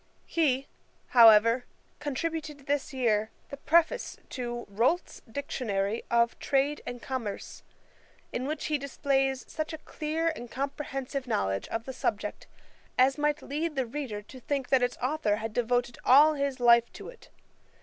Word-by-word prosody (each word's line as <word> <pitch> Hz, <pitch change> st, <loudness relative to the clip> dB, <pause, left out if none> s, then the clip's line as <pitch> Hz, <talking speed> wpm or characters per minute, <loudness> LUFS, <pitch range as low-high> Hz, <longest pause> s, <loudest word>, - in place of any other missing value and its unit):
He, 275 Hz, -5 st, +1 dB, 0.4 s
however, 230 Hz, 0 st, +7 dB, 0.4 s
contributed 295 Hz, 0 st, -4 dB
this 285 Hz, +1 st, -1 dB
year 220 Hz, -5 st, +1 dB, 0.2 s
the 280 Hz, -, -7 dB
Preface[*] 330 Hz, +4 st, +2 dB
to 240 Hz, -1 st, -4 dB
Rolt's 235 Hz, -, 0 dB
Dictionary 220 Hz, -6 st, -2 dB
of 235 Hz, 0 st, +2 dB
Trade 280 Hz, +2 st, +1 dB
and 245 Hz, 0 st, -5 dB
Commerce, 240 Hz, -6 st, -5 dB, 0.7 s
in 255 Hz, +2 st, -2 dB
which 305 Hz, 0 st, -3 dB
he 300 Hz, -1 st, 0 dB
displays 270 Hz, -1 st, 0 dB
such 310 Hz, +1 st, -4 dB
a -, -, -4 dB
clear 315 Hz, +2 st, -2 dB
and 240 Hz, -4 st, -8 dB
comprehensive 275 Hz, 0 st, -4 dB
knowledge 95 Hz, -, -1 dB
of 225 Hz, 0 st, -4 dB
the 265 Hz, -, -6 dB
subject, -, -, -3 dB, 0.5 s
as 265 Hz, +3 st, +4 dB
might 295 Hz, 0 st, 0 dB
lead 305 Hz, +2 st, -3 dB
the 265 Hz, -2 st, 0 dB
reader 235 Hz, -5 st, -5 dB
to 255 Hz, +5 st, -12 dB
think 270 Hz, 0 st, -2 dB
that 265 Hz, -2 st, +4 dB
its 245 Hz, 0 st, 0 dB
authour 255 Hz, -6 st, +1 dB
had 220 Hz, 0 st, -5 dB
devoted 245 Hz, +1 st, 0 dB
all 295 Hz, +4 st, +7 dB
his 280 Hz, -3 st, -2 dB
life 235 Hz, -1 st, +5 dB
to -, -, -9 dB
it. -, -, -15 dB
265 Hz, 150 wpm, -29 LUFS, 235-290 Hz, 0.7 s, however